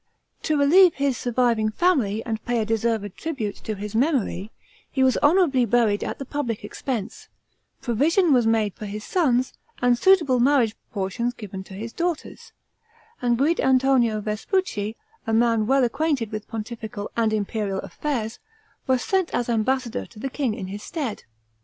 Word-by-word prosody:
To 310 Hz, -, 0 dB
relieve 335 Hz, +5 st, +6 dB
his 275 Hz, -2 st, 0 dB
surviving 235 Hz, -2 st, +1 dB
family 225 Hz, -, +1 dB
and 220 Hz, -2 st, -3 dB
pay 240 Hz, 0 st, -1 dB
a 220 Hz, -, 0 dB
deserved 220 Hz, -2 st, -1 dB
tribute 250 Hz, -11 st, -4 dB
to 215 Hz, -, -5 dB
his 205 Hz, +1 st, -6 dB
memory, 230 Hz, -, 0 dB, 0.4 s
he 265 Hz, -, +1 dB
was 260 Hz, -1 st, +4 dB
honorably 290 Hz, -5 st, +4 dB
buried 230 Hz, -3 st, +2 dB
at -, -, -4 dB
the 275 Hz, -, -6 dB
public 250 Hz, -7 st, -3 dB
expense, 225 Hz, -2 st, -5 dB, 0.6 s
provision 300 Hz, -, +3 dB
was 245 Hz, -3 st, +3 dB
made 220 Hz, -3 st, +2 dB
for 210 Hz, -, -8 dB
his 210 Hz, +1 st, -6 dB
sons, 260 Hz, -8 st, +1 dB, 0.3 s
and 245 Hz, 0 st, +4 dB
suitable 300 Hz, -3 st, +4 dB
marriage 245 Hz, -4 st, +3 dB, 0.2 s
portions 230 Hz, +5 st, -2 dB
given 195 Hz, -4 st, -7 dB
to 190 Hz, -, -11 dB
his 225 Hz, +4 st, -6 dB
daughters, 345 Hz, -2 st, -4 dB, 0.7 s
and 240 Hz, -1 st, +2 dB
Guid' 300 Hz, +7 st, +2 dB
Antonio 255 Hz, -4 st, +3 dB
Vespucci, 215 Hz, -, -2 dB, 0.3 s
a 225 Hz, -, 0 dB
man 230 Hz, -1 st, +3 dB
well 270 Hz, +1 st, +4 dB
acquainted 255 Hz, -2 st, 0 dB
with 215 Hz, -1 st, -5 dB
pontifical 220 Hz, -2 st, -6 dB
and 225 Hz, -2 st, +2 dB
imperial 210 Hz, -1 st, -2 dB
affairs, 240 Hz, -7 st, -4 dB, 0.5 s
was 255 Hz, -1 st, +2 dB
sent 380 Hz, -3 st, +1 dB
as 245 Hz, 0 st, -1 dB
ambassador 240 Hz, +2 st, 0 dB
to 235 Hz, -, -19 dB
the 265 Hz, +5 st, -4 dB
king 255 Hz, -7 st, -1 dB
in 190 Hz, -, -5 dB
his 200 Hz, +2 st, -7 dB
stead. 275 Hz, -9 st, -5 dB
240 Hz, 160 wpm, -24 LUFS, 215-275 Hz, 0.7 s, relieve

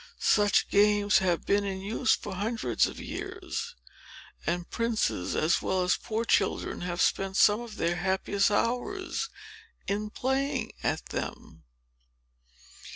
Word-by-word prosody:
Such 205 Hz, -1 st, +3 dB
games 205 Hz, 0 st, +4 dB
have 180 Hz, -3 st, 0 dB
been 200 Hz, 0 st, +2 dB
in 195 Hz, -1 st, -3 dB
use 215 Hz, +6 st, +1 dB
for -, -, -7 dB
hundreds 220 Hz, +5 st, 0 dB
of -, -, -8 dB
years; 390 Hz, +5 st, -5 dB, 0.7 s
and 175 Hz, 0 st, -1 dB
princes 230 Hz, -, -1 dB
as 160 Hz, +2 st, +2 dB
well 185 Hz, -1 st, 0 dB
as 180 Hz, -, +3 dB
poor 225 Hz, +1 st, -3 dB
children -, -, +1 dB
have 175 Hz, 0 st, -3 dB
spent 195 Hz, +1 st, +1 dB
some 210 Hz, +2 st, +5 dB
of 235 Hz, -3 st, -8 dB
their 175 Hz, -2 st, 0 dB
happiest 190 Hz, +2 st, +1 dB
hours 250 Hz, -, -1 dB, 0.6 s
in 210 Hz, +1 st, -1 dB
playing 265 Hz, 0 st, -1 dB
at -, -, -2 dB
them. 80 Hz, -1 st, -6 dB
205 Hz, 130 wpm, -28 LUFS, 190-235 Hz, 0.7 s, some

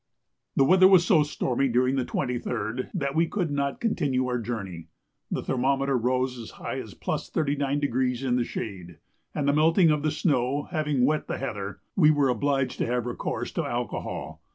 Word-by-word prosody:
The 135 Hz, -, +5 dB
weather 185 Hz, +6 st, +6 dB
was 185 Hz, -3 st, +6 dB
so 175 Hz, -5 st, +5 dB
stormy 140 Hz, -3 st, 0 dB
during 130 Hz, +2 st, +2 dB
the 130 Hz, -, +1 dB
23rd 125 Hz, -3 st, -3 dB
that 140 Hz, -7 st, -2 dB
we 165 Hz, +2 st, +2 dB
could 175 Hz, -6 st, -2 dB
not 140 Hz, +7 st, -1 dB
continue 140 Hz, -, 0 dB
our 125 Hz, -1 st, -1 dB
journey. 100 Hz, -8 st, -5 dB, 0.4 s
The -, -, -2 dB
thermometer 135 Hz, +1 st, +1 dB
rose 125 Hz, +1 st, 0 dB
as 115 Hz, -, -8 dB
high -, -, -4 dB
as -, -, -9 dB
+39° 140 Hz, -4 st, -1 dB
in 125 Hz, -, +2 dB
the 125 Hz, -, +2 dB
shade, 90 Hz, -8 st, -6 dB, 0.4 s
and 145 Hz, -2 st, -1 dB
the 140 Hz, -, +4 dB
melting 165 Hz, +3 st, +4 dB
of 150 Hz, -1 st, +1 dB
the 155 Hz, -, +1 dB
snow 140 Hz, -3 st, 0 dB
having 150 Hz, -6 st, +1 dB
wet 155 Hz, +3 st, 0 dB
the -, -, -3 dB
heather, 100 Hz, -6 st, -5 dB
we 155 Hz, -6 st, +6 dB
were 145 Hz, -3 st, +3 dB
obliged 135 Hz, +2 st, 0 dB
to -, -, 0 dB
have 120 Hz, 0 st, -1 dB
recourse 120 Hz, -, -3 dB
to -, -, -2 dB
alcohol. -, -, -4 dB
135 Hz, 175 wpm, -26 LUFS, 125-150 Hz, 0.4 s, weather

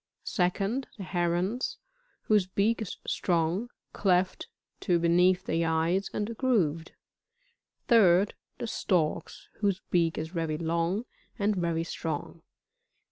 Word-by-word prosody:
2nd 195 Hz, +8 st, 0 dB
The 200 Hz, -, -6 dB
Herons, 180 Hz, +6 st, -1 dB, 0.5 s
whose 210 Hz, -4 st, +3 dB
beeUr 210 Hz, +5 st, +1 dB
is 210 Hz, -, -5 dB
strong, 175 Hz, +6 st, 0 dB, 0.2 s
cleft 185 Hz, -1 st, +1 dB, 0.3 s
to 175 Hz, -, +2 dB
beneath 180 Hz, +2 st, +3 dB
the 165 Hz, +1 st, 0 dB
eyes, 165 Hz, +4 st, +1 dB
and 215 Hz, +2 st, -3 dB
grooved. 170 Hz, -, +1 dB, 0.9 s
3d. 200 Hz, -4 st, +5 dB, 0.3 s
The 245 Hz, -, -4 dB
Storks, 175 Hz, -8 st, -1 dB
whose 200 Hz, -3 st, +1 dB
beak 165 Hz, -2 st, +2 dB
is 160 Hz, +1 st, -3 dB
very 165 Hz, -3 st, -2 dB
long, 170 Hz, +6 st, -1 dB, 0.3 s
and 205 Hz, +1 st, +1 dB
very 170 Hz, -2 st, 0 dB
strong. 165 Hz, -1 st, -5 dB
180 Hz, 115 wpm, -29 LUFS, 165-205 Hz, 0.9 s, 3d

